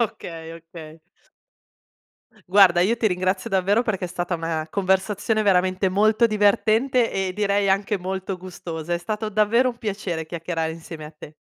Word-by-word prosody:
Okay, 165 Hz, -7 st, -4 dB
okay. 165 Hz, -1 st, -12 dB, 1.5 s
Guarda, 185 Hz, -3 st, +6 dB
io 220 Hz, +6 st, +2 dB
ti 225 Hz, -, +1 dB
ringrazio 185 Hz, 0 st, -1 dB
davvero 195 Hz, +4 st, +2 dB
perché 200 Hz, -6 st, -2 dB
è -, -, -4 dB
stata 175 Hz, 0 st, -3 dB
una 165 Hz, -1 st, -3 dB
conversazione 200 Hz, +3 st, 0 dB
veramente 185 Hz, -1 st, +2 dB
molto 215 Hz, +4 st, +3 dB
divertente, 225 Hz, +4 st, +2 dB
e 190 Hz, -1 st, -2 dB
direi 200 Hz, 0 st, +1 dB
anche 195 Hz, +1 st, +1 dB
molto 190 Hz, +1 st, -4 dB
gustosa. 175 Hz, -2 st, -6 dB
È -, -, -1 dB
stato 215 Hz, +3 st, -4 dB
davvero 215 Hz, +5 st, +2 dB
un 240 Hz, -1 st, -6 dB
piacere 195 Hz, -7 st, -4 dB
chiacchierare 165 Hz, -1 st, -3 dB
insieme 160 Hz, -1 st, -9 dB
a 150 Hz, -, -9 dB
te. 150 Hz, 0 st, -12 dB
190 Hz, 150 wpm, -23 LUFS, 170-210 Hz, 1.5 s, Guarda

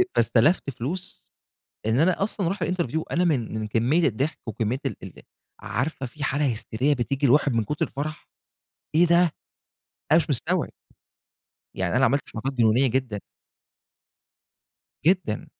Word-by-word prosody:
فاستلفت 125 Hz, +8 st, +3 dB
فلوس 140 Hz, +9 st, -5 dB, 0.5 s
إن 110 Hz, +4 st, +2 dB
أنا 185 Hz, +4 st, +3 dB
أصلًا 195 Hz, -3 st, -1 dB
أرُوح 190 Hz, +1 st, -2 dB
الinterview. 160 Hz, -3 st, -1 dB
أنا 175 Hz, -, +2 dB
من 120 Hz, -9 st, 0 dB
من 110 Hz, -, -3 dB
كمية 125 Hz, +10 st, +2 dB
الضحك، 135 Hz, +7 st, -2 dB
وكمية 115 Hz, +4 st, -2 dB
ال -, -, -1 dB
ال -, -, -10 dB, 0.4 s
عارفة، 135 Hz, +4 st, -3 dB
فيه 145 Hz, +4 st, -8 dB
حالة 140 Hz, -2 st, +1 dB
هستيرية 125 Hz, +6 st, 0 dB
بتيجي 135 Hz, +3 st, -1 dB
للواحد 140 Hz, 0 st, +4 dB
من 115 Hz, -, +1 dB
كُتر 150 Hz, +7 st, -1 dB
الفرح. 150 Hz, +4 st, -6 dB, 0.7 s
إيه 175 Hz, -, +6 dB
ده! 170 Hz, -1 st, +4 dB, 0.8 s
أنا -, -, +8 dB
مش -, -, -1 dB
مستوعب. -, -, 0 dB, 1.0 s
يعني 95 Hz, +5 st, -1 dB
أنا 130 Hz, -, +4 dB
عملت 140 Hz, +3 st, +2 dB
حركات 130 Hz, +5 st, -3 dB
جنونية 120 Hz, +1 st, +3 dB
جدًا. 120 Hz, -5 st, -1 dB, 1.9 s
جدًا. 175 Hz, -, +1 dB
135 Hz, 140 wpm, -25 LUFS, 115-160 Hz, 1.9 s, أنا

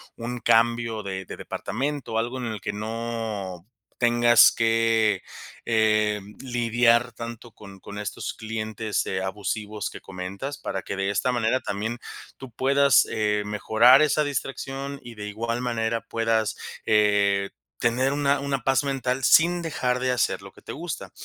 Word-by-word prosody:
un 120 Hz, +1 st, -5 dB
cambio 115 Hz, -1 st, +2 dB
de 95 Hz, -1 st, -5 dB
de -, -, -8 dB
departamento, 135 Hz, -2 st, -3 dB
algo 120 Hz, +3 st, -2 dB
en 125 Hz, -, -4 dB
el 110 Hz, -4 st, -4 dB
que 105 Hz, -, -3 dB
no 110 Hz, -4 st, -4 dB, 0.3 s
tengas 120 Hz, -1 st, +6 dB
que, 115 Hz, -3 st, +2 dB, 0.4 s
em, 105 Hz, -2 st, +1 dB
lidiar 120 Hz, -1 st, +2 dB
tanto 115 Hz, +1 st, -8 dB
con 100 Hz, -2 st, -13 dB
con 100 Hz, +2 st, -9 dB
estos 105 Hz, -1 st, -4 dB
clientes, 110 Hz, -1 st, -3 dB
eh, 95 Hz, 0 st, -2 dB
abusivos 105 Hz, +1 st, -3 dB
que -, -, -10 dB
comentas 100 Hz, +10 st, -6 dB
para 95 Hz, -, -4 dB
que 100 Hz, -, -5 dB
de 95 Hz, 0 st, -1 dB
esta 100 Hz, +5 st, +1 dB
manera 120 Hz, +1 st, +1 dB
también 110 Hz, +4 st, -3 dB, 0.4 s
tú 130 Hz, -2 st, -10 dB
puedas, 140 Hz, +2 st, +4 dB
eh, 105 Hz, -2 st, +1 dB
mejorar 110 Hz, +5 st, +5 dB
esa 150 Hz, 0 st, +2 dB
distracción 135 Hz, 0 st, -4 dB
y 120 Hz, -1 st, -10 dB
de 105 Hz, -1 st, -6 dB
igual 115 Hz, +3 st, -3 dB
manera 115 Hz, -2 st, -1 dB
puedas, 115 Hz, -1 st, 0 dB, 0.3 s
eh, 100 Hz, -2 st, +3 dB, 0.3 s
tener 125 Hz, +3 st, +1 dB
una 145 Hz, -1 st, +2 dB
una 140 Hz, -3 st, -2 dB
paz 135 Hz, +2 st, +2 dB
mental 135 Hz, -1 st, -1 dB
sin 175 Hz, +4 st, +5 dB
dejar 125 Hz, -6 st, -1 dB
de 130 Hz, 0 st, 0 dB
hacer 125 Hz, -, 0 dB
lo -, -, -11 dB
que -, -, -18 dB
te -, -, -8 dB
gusta. -, -, -6 dB
115 Hz, 155 wpm, -25 LUFS, 105-125 Hz, 0.4 s, tengas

